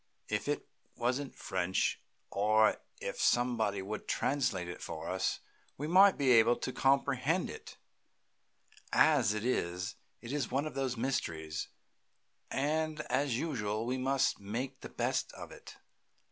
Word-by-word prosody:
If - - -1
it - - -1 0.3
wasn't 130 +3 -1
French, 95 0 -1 0.3
or 110 +2 +4 0.2
if - - -4
somebody 115 -5 +2
would 105 +2 -5
translate 125 -11 0
it 90 - -7
for - - -6
us, - - -1 0.4
we 145 - -3
might 190 +4 +6
be 135 -3 +3
able 115 0 +6
to 125 +2 -4
comprehend 140 +4 +2
it; 445 +1 -10 1.1
as 135 -9 +4
it 105 +1 -3
is, 90 -7 -1 0.2
it 115 - -8
is 145 -5 -1
one 140 +3 0
of 155 - -5
the 135 -2 -1
mysteries, 80 -11 -2 0.8
and, 155 +2 0
as 135 -2 +1
usual, 110 -8 -2
we 130 +2 -1
must 135 +1 +1
make 125 +7 -4
the - - -7
best - - -1
of - - -9
it. - - -12
125 Hz, 140 wpm, -32 LUFS, 105-140 Hz, 1.1 s, might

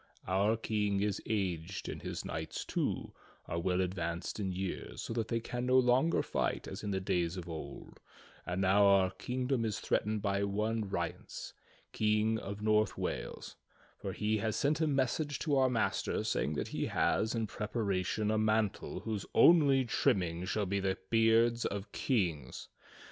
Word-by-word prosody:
Our 100 +5 +2
King 105 -3 0
is 105 -1 -1
aged 95 -4 -2
and - - -5
his - - -5
knights, 80 +1 -4
too, - - -2 0.3
are 85 - -3
well 90 +2 +1
advanced 85 0 -3
in 95 -2 -1
years, 95 0 -4
so - - -4
that 115 -1 -1
they 115 - 0
can 120 +2 -4
no 130 0 +5
longer 130 +6 +3
fight - - -1
as - - -6
in 105 - -4
the 95 -1 0
days 90 -2 0
of 90 -1 -6
old; 80 -2 -8 0.4
and 90 +2 -2
now 100 +2 +5
our 95 -2 +5
king 125 +6 -3
dom 125 -3 +1
is 110 -2 -1
threatened 105 -1 0
by 100 -1 +1
one 105 +1 -1
Rience, - - -4 0.4
King 110 +1 +2
of 100 +1 -6
North 110 0 +2
Wales, - - -4 0.4
for 100 - -4
he 105 +2 0
has 110 0 -1
sent 150 +3 +1
a 160 - +3
message 140 +1 0
to 150 -3 0
our 130 -1 +4
master 120 -3 0
saying 75 - 0
that - - -3
he - - -2
has 110 +2 +1
in 115 -1 0
preparation 105 -1 -1
a 110 - +2
mantle 110 -1 0
whose 110 -3 -4
only 140 -6 +6
trimming 90 -9 +1
shall 105 +2 0
be 100 +1 0
the 95 -1 0
beards 115 +1 +4
of 100 +1 -3
kings. 85 - -1
105 Hz, 170 wpm, -33 LUFS, 95-115 Hz, 0.4 s, only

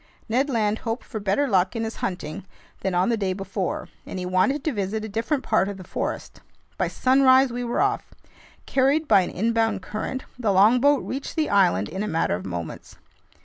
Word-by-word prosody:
Ned 255 +5 +1
Land 220 -4 0
hoped 230 +1 -3
for 220 - -5
better 205 +8 +1
luck 190 -1 +2
in 225 - -1
his 225 0 -5
hunting 180 -1 -4 0.4
than 190 -2 -2
on 180 +4 +2
the 230 - +1
day 195 -3 -1
before, 195 -1 -3 0.2
and - - -7
he 180 - -3
wanted 185 +11 +1
to 310 - -1
visit 210 +1 -2
a - - -4
different 230 +7 -1
part 195 - +2
of 200 - -6
the 185 - -9
forest. - - -5 0.3
By - - 0
sunrise 260 0 +4
we 245 0 -3
were 240 0 -1
off. 405 0 0 0.5
Carried 280 +4 +2
by 200 -7 +6
an 180 - -3
inbound 225 -1 0
current, 240 +6 -4 0.2
the 220 -4 +1
longboat 245 +9 +4
reached 270 +2 -5
the 315 -2 0
island 180 - +3
in 190 +5 -5
a 215 - -2
matter 165 - 0
of 90 +2 -4
moments. 85 -3 -6
220 Hz, 200 wpm, -24 LUFS, 190-260 Hz, 0.5 s, by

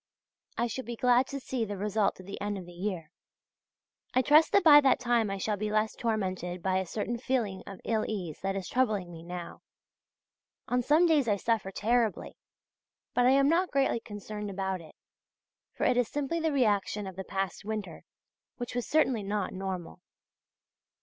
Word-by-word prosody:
I 235 - +1
shall 250 +3 -4
be 235 0 -5
glad 250 +2 +3
to 275 - -5
see 255 -2 -3
the 205 -2 -4
result 205 0 0
at 185 - -11
the 200 - -7
end 205 0 -2
of 185 - -7
the 175 - -12
year. 175 -3 -4 1.0
I 255 - +4
trust 305 +5 +5
that 400 - +4
by 295 -3 +9
that 270 -3 +4
time 240 -3 +1
I 195 - -2
shall 205 +2 -1
be 210 +1 -2
less 215 +1 +1
tormented 185 -6 -2
by 190 0 +2
a 190 - -3
certain 230 +6 -3
feeling 230 -7 -1
of 195 -2 -8
ill 220 -2 0
ease 180 -8 -4
that 195 0 -1
is 195 -2 -4
troubling 215 -8 0
me 165 -1 -9
now. 175 0 -7 1.1
On 250 0 +1
some 300 +7 +4
days 305 -7 +3
I 205 - +3
suffer 215 -1 0
terribly! 225 +2 0 0.8
but 245 0 +3
I - - +6
am 275 0 +4
not 345 +4 +2
greatly 270 -3 +1
concerned 210 -1 -7
about 190 -2 -3
it, 155 - -15 0.8
for - - -3
it 245 - +3
is 245 -2 +2
simply 290 +3 -2
the 320 -1 0
reaction 210 -5 +1
of 190 -1 -7
the 190 - -5
past 195 0 -3
winter, 215 -1 -5 0.5
which 245 -1 -5
was 245 -1 -2
certainly 265 -7 +2
not 200 -1 -2
normal. 185 -2 -5
215 Hz, 190 wpm, -29 LUFS, 190-250 Hz, 1.1 s, by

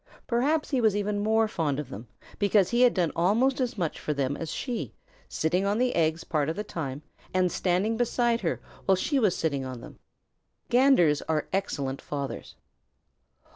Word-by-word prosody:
Perhaps 285 +7 0
he 265 -3 +2
was 220 -3 +3
even 205 0 -1
more 220 +1 +2
fond 155 -9 -1
of 145 -4 -5
them 115 -1 -8 0.3
because 200 -2 +3
he 240 +1 +2
had 250 -1 +5
done 175 -5 +1
almost 230 +11 +2
as 245 -3 -2
much 170 -5 -2
for 150 - -2
them 140 0 -1
as 165 +1 -5
she, 245 -3 -4 0.3
sitting 175 +4 0
on 200 +1 +1
the 250 +1 +1
eggs 160 0 +1
part 155 -3 -1
of 160 - -2
the 210 - -3
time 145 -7 -5 0.3
and 180 -1 +3
standing 190 +5 0
beside 240 0 +1
her 170 - -1 0.3
while 190 - +5
she 275 +9 0
was 210 -7 +2
sitting 140 -4 -1
on 130 -2 -6
them. 115 - -12 0.7
Ganders 240 - +4
are 155 -2 0
excellent 140 -9 -2
fathers. 140 -2 -5
185 Hz, 180 wpm, -27 LUFS, 155-230 Hz, 0.7 s, had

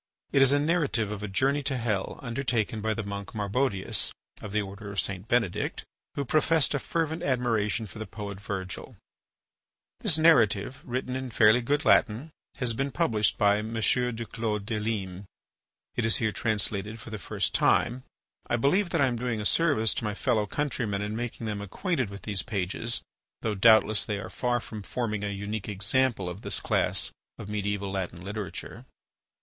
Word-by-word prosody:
It 140 - +4
is 135 0 +7
a 145 - +5
narrative 145 - +1
of 105 -1 -5
a 105 - -3
journey 135 +9 +1
to 135 -2 -1
hell 110 -5 -1
undertaken 120 -3 -1
by 110 0 0
the 110 - -3
monk 100 +1 -6
Marbodius, 105 -1 0 0.3
of 105 - -7
the 105 0 +1
order 100 +1 -8
of 100 - -2
St. 95 +1 -1
Benedict, 115 -6 0 0.3
who 140 - -1
professed 155 +4 +3
a 145 - +1
fervent 160 +2 -1
admiration 115 -4 +1
for 110 - -10
the 110 - -5
poet 100 0 -7
Virgil. 95 -3 -5 1.0
This 160 - +3
narrative, 130 -6 +4
written 130 +1 -3
in 130 -1 -3
fairly 110 +1 +5
good 145 +4 0
Latin, 120 +9 +3 0.2
has 125 -3 0
been 135 +4 -1
published 110 -2 +1
by 100 0 +4
M. 110 +2 -5
du 115 +1 +1
Clos 110 -2 -2
des 110 +1 -2
Limes. 100 -4 -3 0.7
It 120 - 0
is 115 -1 +4
here 110 -2 +1
translated 105 -1 -1
for 115 - -10
the 110 - -4
first - - -1
time. 125 +2 +3 0.5
I - - +1
believe 175 - +2
that - - +1
I - - +6
am 125 -2 0
doing 120 -2 -2
a 105 - -4
service 140 -7 +3
to - - -3
my 105 -2 -2
fellow 110 -3 +1
countrymen 115 -7 -1
in 105 +1 -3
making 120 0 -4
them 105 -2 -3
acquainted 130 - -1
with 100 0 -9
these 100 -4 0
pages, 105 +2 -2 0.4
though 110 - 0
doubtless 110 0 +5
they 105 -2 -2
are 95 -2 -7
far 125 -1 0
from 110 -2 -7
forming 110 -1 -2
a 105 - -1
unique 100 +1 -4
example 105 +1 +1
of 90 +3 -6
this - - +1
class - - +1 0.3
of - - -8
mediaeval 100 -1 -2
Latin 90 -3 -3
literature. 105 0 -6
110 Hz, 180 wpm, -28 LUFS, 100-125 Hz, 1.0 s, is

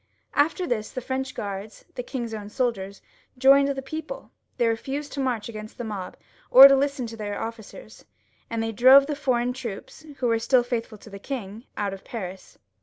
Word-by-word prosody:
After 325 +5 +2
this 220 -8 -2
the - - -5
French 260 +1 -4
Guards, 200 +1 -6
the - - -4
king's 240 -2 -5
own 205 -2 -6
soldiers, 205 -5 -2 0.3
joined 275 +2 +6
the 270 -1 -3
people; 315 - -7 0.3
they 240 - +2
refased 270 +6 -3
to 280 - -5
march 250 -5 -1
agaiost 215 -2 -9
the 240 - -5
mob, 205 -5 -6 0.3
or 265 +2 +11
to 275 - +5
listen 275 -1 0
to 230 0 -7
their 205 -2 -4
ofScers, 230 - -8 0.4
and 230 -1 -2
they 225 - -2
drove 260 +5 +7
the 295 0 -3
foreign 250 -3 0
troops, 245 +1 -8
who 255 - -2
were 230 -1 +2
still 245 +2 +3
faithful 235 -3 -4
to 215 - -15
the 200 - -8
king, 225 -2 -6
out 200 -1 -1
of 195 - -10
Paris. 190 -5 -8
240 Hz, 190 wpm, -25 LUFS, 215-270 Hz, 0.4 s, or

